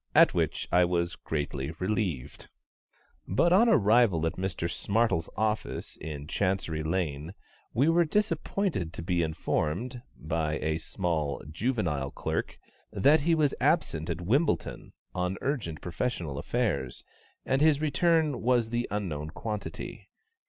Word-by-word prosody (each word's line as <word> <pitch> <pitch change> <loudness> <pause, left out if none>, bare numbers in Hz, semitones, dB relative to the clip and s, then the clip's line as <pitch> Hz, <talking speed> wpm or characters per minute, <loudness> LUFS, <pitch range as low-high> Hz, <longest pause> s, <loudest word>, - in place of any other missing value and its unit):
At - - +7
which - - -1
I 90 - +5
was 85 -1 0
greatly 70 -1 -3
relieved. 95 - -2 0.8
But 170 - +3
on 230 +6 +6
arrival 105 - +4
at 80 - 0
Mr 90 -2 -2
SMARTLE'S 100 -3 0
office 110 +1 -1
in 75 -2 -6
Chancery 90 -2 -1
Lane, 80 0 -2 0.4
we 135 +6 +4
were 170 +1 +5
disappointed 190 - -1
to 85 - -6
be 90 0 +1
informed, 85 - -1 0.2
by 80 0 -1
a 80 +1 -1
small, 80 -5 -2
juvenile 85 - -1
clerk, - - -3 0.3
that 140 +10 +4
he 165 +3 +3
was 150 -3 +2
absent 80 +2 +1
at 85 +1 -2
Wimbledon 130 - 0 0.2
on 90 +1 -1
urgent 110 - -2
professional 85 - -3
affairs, 110 - -1 0.4
and 135 +1 +1
his 155 -2 +5
return 155 0 +2
was 120 -2 +2
the 120 +1 0
unknown 85 -7 -3
quantity. 105 +5 -6
95 Hz, 130 wpm, -29 LUFS, 80-125 Hz, 0.8 s, At